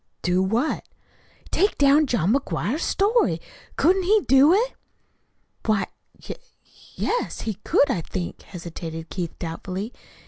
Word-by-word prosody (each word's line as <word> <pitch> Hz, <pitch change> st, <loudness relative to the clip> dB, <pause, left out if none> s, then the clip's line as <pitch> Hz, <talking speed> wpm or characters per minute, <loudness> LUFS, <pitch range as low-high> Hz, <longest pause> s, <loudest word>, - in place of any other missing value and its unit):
"Do 180 Hz, +1 st, +2 dB
what?" 225 Hz, +10 st, 0 dB, 0.7 s
"Take 405 Hz, +3 st, +2 dB
down 285 Hz, +2 st, +5 dB
John 210 Hz, -5 st, +2 dB
McGuire's 275 Hz, +1 st, -1 dB
story. 435 Hz, +5 st, +2 dB, 0.4 s
Couldn't 375 Hz, +3 st, +3 dB
he 410 Hz, +4 st, +3 dB
do 270 Hz, +4 st, +6 dB
it?" 460 Hz, +7 st, +2 dB, 0.9 s
"Why, 210 Hz, -4 st, +2 dB, 0.4 s
y -, -, -5 dB, 0.6 s
yes, -, -, -2 dB
he 220 Hz, -, -2 dB
could, 280 Hz, -, +3 dB
I 180 Hz, -, -1 dB
think," 175 Hz, +2 st, -5 dB
hesitated 165 Hz, -2 st, -8 dB
Keith 175 Hz, -3 st, -4 dB
doubtfully. 185 Hz, +6 st, -5 dB
235 Hz, 125 wpm, -24 LUFS, -, 0.9 s, do